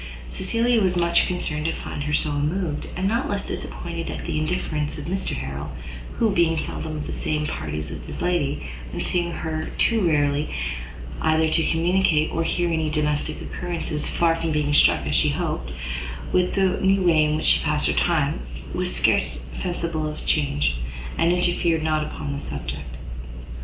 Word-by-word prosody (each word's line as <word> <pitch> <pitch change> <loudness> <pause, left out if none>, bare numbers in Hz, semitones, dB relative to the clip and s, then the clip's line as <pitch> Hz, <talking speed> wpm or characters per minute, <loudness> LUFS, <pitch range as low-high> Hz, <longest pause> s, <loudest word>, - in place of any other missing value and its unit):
Cecilia 230 - +2
was 185 -2 +2
much 170 0 +4
concerned 155 -4 -2
to 165 - +1
find 145 - -5
her 150 - -1
so 150 0 +2
unmoved; 150 +2 -1
and 185 +2 0
not 230 +5 0
less 200 -1 -1
disappointed - - -4
at - - -5
the - - -1
indifference 155 -2 -1
of - - -6
Mr 190 +3 -2
Harrel, 70 +1 -5 0.4
who, 225 -2 +3
being 170 -3 +3
seldom 155 0 -2
of 150 - -4
the - - -4
same 150 0 -1
parties 75 - -3
with - - -7
his - - -5
lady, 170 - 0 0.3
and - - -3
seeing 175 -1 0
her 160 -1 -3
too 230 -2 +3
rarely 145 -3 +2 0.7
either 160 0 +3
to 160 +1 +3
communicate 165 -2 +3
or 165 - 0
hear 175 0 +1
any 160 -1 +1
domestic 150 -1 0
occurrences, 170 -3 -3
far 165 -1 +2
from 165 0 -1
being 150 -1 +1
struck, - - +5
as - - -1
she - - +4
had - - -1
hoped, - - -2 0.6
with 180 0 +2
the 190 -1 +2
new 195 0 +4
way 165 -3 +5
in 150 0 +1
which 155 - -2
she - - +5
passed 150 -1 +1
her - - +3
time, 155 -5 +2 0.3
was - - 0
scarce - - +2
sensible 170 -3 -2
of 150 - -6
the - - -10
change, 75 - +1 0.4
and 165 +1 +3
interfered 175 -2 +2
not 155 -1 +2
upon 145 -1 -4
the 140 - -3
subject. 70 - -5
155 Hz, 185 wpm, -24 LUFS, 145-175 Hz, 0.7 s, struck